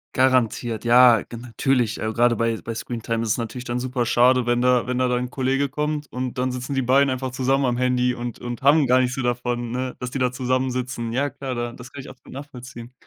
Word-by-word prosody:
Garantiert, 125 -3 +1
ja, 120 -2 +6
ge 115 - -10
natürlich, 120 0 0
äh. 110 0 -2
Gerade 120 0 +3
bei 115 0 -1
bei 115 - -6
Screentime 115 0 -3
ist 110 - -3
es - - +1
natürlich 120 +2 -5
dann 120 +1 -2
super 125 -1 -2
schade, 125 +1 +3
wenn 120 0 +1
da 125 -1 +3
wenn 125 0 -2
da 130 - +2
dein 125 0 0
'n 125 - -8
Kollege 135 +1 0
kommt 150 +1 -2
und 125 0 -4
dann 130 0 0
sitzen 125 +2 -4
die 135 - +1
beiden 135 +3 +4
einfach 130 0 -3
zusammen 135 +2 +1
am 120 -1 0
Handy 125 0 +1
und 120 -1 -6
und 120 -1 -6
haben 145 +1 +5
gar 130 +1 +4
nichts 125 0 0
so 135 - -3
davon, 120 -1 -2
ne, 130 0 -3
dass 125 -1 -5
die 135 - -3
da 125 -1 +1
zusammensitzen. 125 -2 -2
Ja, 140 +1 0
klar, 130 -1 -5
da 120 0 -3
das 125 0 -12
kann 140 - -9
ich 135 - -9
absolut 130 - -17
nachvollziehen. 125 -3 -10
125 Hz, 240 wpm, -23 LUFS, 120-130 Hz, -, ja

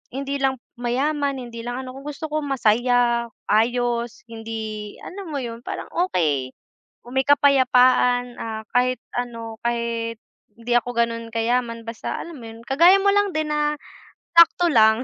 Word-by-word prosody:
hindi 275 +1 -2
lang 270 -1 +1 0.2
mayaman, 280 +4 0
hindi 235 -1 -8
lang 245 +2 -3
ano, 255 - -7
kung 275 - -11
gusto 295 +2 -5
ko 310 - 0
masaya, 245 -3 +2 0.2
ayos, 235 +1 +1
hindi 220 -2 -6
alam 390 0 -8
mo 280 - -2
yun, 230 -2 -6
parang - - -5
okey, 150 - 0 0.6
may 265 +1 +1
kapayapaan, 255 -3 +4
ah, 220 -1 -5
kahit 250 +1 +2 0.2
ano, 230 -2 -5
kahit 235 -1 -1 0.4
hindi 235 +1 -7
ako 240 - -2
ganun 230 0 0
kayaman 230 0 -1
basta 230 -1 -4
alam 335 -2 -9
mo 230 - -10
yun, 225 0 -11
kagaya 335 +8 +6
mo 400 0 +4
lang 405 -1 +2
din 310 -1 -1
na 300 0 +1 0.6
sakto 340 +1 +6
lang, 220 -1 +5
245 Hz, 150 wpm, -22 LUFS, 230-280 Hz, 0.6 s, kagaya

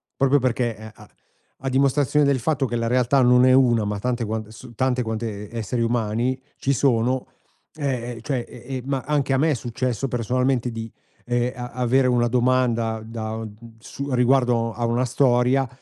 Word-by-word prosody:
Proprio 135 +1 +3
perché 120 -3 -1
e 110 0 -10
a 105 -1 -16 0.5
a 135 - -1
dimostrazione 140 +2 +2
del 140 -2 +2
fatto 145 +2 0
che 120 - -3
la 115 0 -1
realtà 125 +2 +3
non 125 0 +5
è 130 - +5
1, 120 -4 +4
ma 105 0 -2
tante 120 +1 -1
quante 110 0 -4
s 120 +2 -12
tante 125 +1 0
quante 110 -2 -4
e 120 - -8
esseri 115 +2 -2
umani 115 +2 0 0.2
ci 140 - 0
sono. 125 -1 +1 0.5
Ehm, 125 -5 -3
cioè, 130 -1 -2
ehm, 120 - -12
ehm, - - -5
ma 135 -2 -1
anche 145 -2 0
a - - +3
me 155 +4 +2
è - - +3
successo 125 0 -2
personalmente 125 +1 0
di, 115 -1 -6 0.3
ehm, 120 0 0
a 125 -1 -6
avere 125 +2 +2
una 120 -1 +2
domanda 120 -2 +1
da 110 -1 -5
o 110 - -5
d 105 -1 -11 0.2
su 140 +5 -7
riguardo 125 -2 +2
a 120 +1 -2
una 120 +2 +1
storia 125 +1 +2
125 Hz, 190 wpm, -23 LUFS, 115-130 Hz, 0.5 s, non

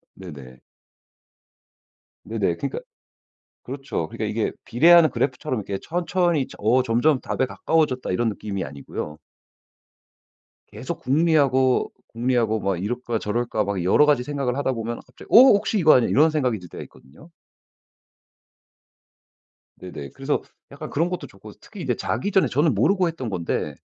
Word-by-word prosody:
네네. 70 -9 -11 1.6
네네 105 -6 -1
그러니까 140 - -4 0.8
그렇죠 135 - -5
그러니까 - - -5
이게 - - -1
비례하는 165 +6 +6
그래프처럼 130 -1 -2
이렇게 100 -1 -5
천천히 175 -4 0
'어 120 +5 +3
점점 130 +4 +2
답에 130 - -1
가까워졌다.' 150 -2 0
이런 115 +6 0
느낌이 100 -2 -4
아니고요. 75 +2 -7 1.5
계속 - - -6
궁리하고 135 -3 +2 0.2
궁리하고 115 -2 0
막 95 -4 -2
이럴까 120 +1 -3
저럴까 110 +1 -1
막 100 -3 -3
여러 95 +11 +4
가지 145 -4 +2
생각을 140 -3 -2
하다 140 -2 0
보면 115 0 -4
갑자기 125 - -16
'어 - - +4
혹시 225 -4 +6
이거 155 -4 +6
아냐?' 125 - +3
이런 155 +5 +4
생각이 130 -8 0
들 90 -1 -13
때가 - - -8
있거든요. 75 - -18 2.5
네네. 75 -6 -8
그래서 135 +2 -2 0.3
약간 150 +2 -8
그런 165 +4 0
것도 180 -1 -5
좋고 - - -14
특히 - - -11
이제 - - -1
자기 205 - -2
전에 190 - +3
저는 145 -1 +1
모르고 180 - +2
했던 145 -8 -5
건데 90 -4 -3
125 Hz, 330 characters per minute, -23 LUFS, 105-150 Hz, 2.5 s, 비례하는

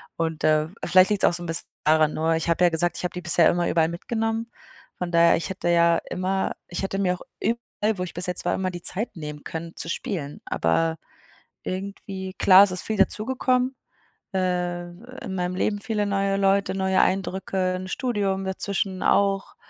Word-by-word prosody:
und, 160 -1 -2
äh, 155 0 +3 0.2
vielleicht 185 +2 +5
liegt's 205 -2 +2
auch - - +4
so 175 0 0
'n - - -6
bisschen 165 0 -2 0.2
daran. 155 0 +3
Nur, 160 +1 +1
ich 160 - -2
habe 170 +2 +2
ja 175 - +6
gesagt, 170 +1 0
ich - - -4
habe 180 - -2
die 180 - -5
bisher 170 -1 +4
immer 175 0 +1
überall 165 -1 +2
mitgenommen. 225 +5 -2 0.5
Von 180 -1 -4
daher, 170 0 +5
ich 170 - -3
hätte 185 -2 -4
ja 170 -1 +4
immer 190 +1 -1 0.2
ich 175 - -3
hätte 195 0 -2
mir 180 -2 +1
auch - - -15 0.2
überall, 220 -2 -1
wo 180 - -2
ich 175 - -6
bis 180 +2 -1
jetzt 180 - -1
war, - - +1
immer 185 -1 -2
die 175 -1 -7
Zeit 200 0 -1
nehmen 150 -1 -7
können, 165 +1 -6
zu 165 - -3
spielen. 170 - -4
Aber 160 - +1 0.7
irgendwie 190 0 -5
klar, 190 +1 +7
es 190 - -4
ist 180 - -2
viel 215 -2 -2
dazugekommen, 255 +5 +1 0.6
äh, 180 -1 -1 0.4
in 190 -2 -4
meinem 180 0 -2
Leben 205 +2 0
viele 210 -1 -1
neue 195 0 0
Leute, 195 0 +2
neue 190 0 +2
Eindrücke, 190 -1 0
'n 185 0 -5
Studium 200 -6 -1
dazwischen 190 0 -2
auch. 195 -1 +2
185 Hz, 195 wpm, -24 LUFS, 170-195 Hz, 0.7 s, klar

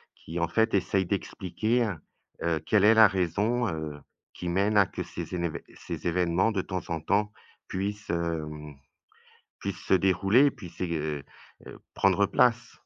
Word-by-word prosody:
qui, 85 +2 -6
en 85 - +1
fait, 110 +6 +1
essaye 95 -1 +1
d'expliquer, 110 +5 -1 0.5
heu, 80 -2 +1
quelle 105 -2 +3
est 110 - +7
la 110 -1 +8
raison, 105 +6 0
heu, 80 -3 -5 0.3
qui 90 - -6
mène 100 +4 +2
à 100 - +7
que - - -5
ces - - -7
émén 85 -2 -1 0.2
ces - - -6
évènements 90 +4 +2
de 95 - 0
temps 90 -1 -4
en 85 -1 -1
temps 105 +6 +1 0.4
puissent, 105 +3 -4
hem, 75 -3 -3 0.9
puissent - - -5
se - - +4
dérouler, 95 +8 +4
puissent 90 -9 -12
ég 90 -2 -1
heu 75 -3 -2 0.4
heu, - - -10 0.2
prendre 95 +1 +3
place. 115 +2 +2
95 Hz, 160 wpm, -28 LUFS, 85-105 Hz, 0.9 s, la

